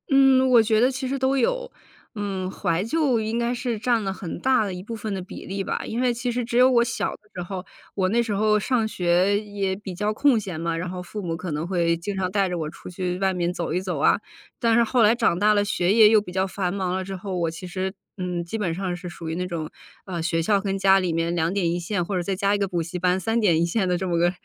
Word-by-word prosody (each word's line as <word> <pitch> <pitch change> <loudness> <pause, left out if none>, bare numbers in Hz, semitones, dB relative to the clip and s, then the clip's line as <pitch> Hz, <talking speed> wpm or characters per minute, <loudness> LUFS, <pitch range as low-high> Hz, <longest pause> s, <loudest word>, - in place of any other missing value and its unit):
嗯， 270 -2 +5
我 240 -2 +7
觉 220 0 +2
得 250 +3 +4
其 265 0 -4
实 275 +2 -1
都 265 +1 +2
有。 - - 0 0.4
嗯， 195 -3 -3
怀 175 -2 -1
旧 260 -1 +1
应 220 +2 -2
该 235 +1 0
是 245 -3 -3
占 230 0 +1
了 195 - -1
很 185 -2 -6
大 255 -4 +3
的 195 - -4
一 180 0 -7
部 230 - -7
分 215 -2 -4
的 190 - -3
比 180 - -9
例 195 +1 -3
吧， - - -2
因 235 +3 -3
为 250 -1 +2
其 245 +1 -3
实 245 +1 -1
只 235 +1 -2
有 255 +1 +7
我 240 -2 +4
小 235 - -2
的 - - -19
时 180 - -5
候， 185 +1 -6 0.3
我 185 -2 +1
那 235 +4 +2
时 225 -3 -2
候 210 +1 +3
上 235 +1 +1
学 185 0 +2
也 205 -2 -3
比 195 -3 -7
较 210 +3 -1
空 270 +2 +3
闲 190 -6 -4
嘛， 165 0 -1
然 170 +2 -3
后 180 0 -5
父 205 +4 -7
母 165 -3 -3
可 175 0 -5
能 150 +2 -2
会 170 -2 +1
经 185 +5 -4
常 185 -1 0
带 195 0 +1
着 180 - -2
我 155 -2 -3
出 160 - -11
去 180 0 -3
外 190 -1 +1
面 175 -1 -1
走 175 -2 -3
一 175 - +1
走 180 -4 -3
啊。 140 - +4 0.4
但 230 -1 +3
是 235 - +5
后 235 +1 +2
来 220 +2 +5
长 225 -7 +1
大 210 +1 +4
了， 205 -1 +3
学 195 -2 +1
业 220 -1 +7
又 220 0 +6
比 190 -3 -8
较 190 +1 +1
繁 185 -2 -2
忙 190 -2 -1
了 190 0 -2
之 195 0 -5
后， 190 0 -4
我 170 -2 0
其 165 +3 -8
实 185 +1 -3 0.2
嗯， 180 -2 -3
基 170 +6 -4
本 175 -6 -1
上 185 -1 -2
是 180 +1 -8
属 165 -1 -7
于 160 - -3
那 180 +1 -2
种 165 -3 -4 0.3
呃， 175 -3 -4
学 165 0 0
校 200 +3 +3
跟 195 -1 -2
家 195 0 +5
里 180 -2 -1
面 165 +1 0
两 165 -1 0
点 180 -4 +1
一 175 - -1
线， 175 +1 -1
或 195 - -3
者 - - 0
再 190 +2 -2
加 200 +1 +1
一 - - +2
个 200 - +1
补 175 -3 -1
习 175 +2 -5
班， 180 +1 +2
三 225 +5 0
点 175 -8 +3
一 170 - +3
线 190 +3 0
的 180 - +1
这 190 - -3
么 170 -1 0
个 175 +1 +3
195 Hz, 310 characters per minute, -24 LUFS, 175-220 Hz, 0.4 s, 我